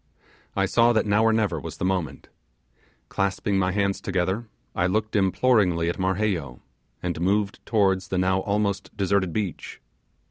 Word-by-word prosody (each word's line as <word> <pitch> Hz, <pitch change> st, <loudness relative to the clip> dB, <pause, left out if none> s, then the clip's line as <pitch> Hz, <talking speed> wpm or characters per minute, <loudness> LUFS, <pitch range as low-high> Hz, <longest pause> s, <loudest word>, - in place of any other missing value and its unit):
I -, -, +2 dB
saw 120 Hz, 0 st, +3 dB
that 110 Hz, -, +2 dB
now 105 Hz, +1 st, +3 dB
or 115 Hz, -, +4 dB
never 105 Hz, -7 st, 0 dB
was -, -, -8 dB
the -, -, -2 dB
moment. 90 Hz, -7 st, -2 dB, 0.8 s
Clasping 95 Hz, 0 st, -1 dB
my 95 Hz, 0 st, +1 dB
hands 100 Hz, 0 st, 0 dB
together, 95 Hz, +4 st, -1 dB, 0.3 s
I 90 Hz, -, +1 dB
looked 110 Hz, +3 st, -1 dB
imploringly 95 Hz, -4 st, +2 dB
at 85 Hz, -, -4 dB
Marheyo, 95 Hz, -, -1 dB, 0.4 s
and 85 Hz, -2 st, -3 dB
move 100 Hz, +2 st, +1 dB
towards 95 Hz, -4 st, +1 dB
the 95 Hz, -, -2 dB
now 95 Hz, +1 st, +2 dB
almost 100 Hz, 0 st, -2 dB
deserted 95 Hz, -2 st, +1 dB
beach. 100 Hz, -3 st, -4 dB
95 Hz, 150 wpm, -25 LUFS, 90-105 Hz, 0.8 s, or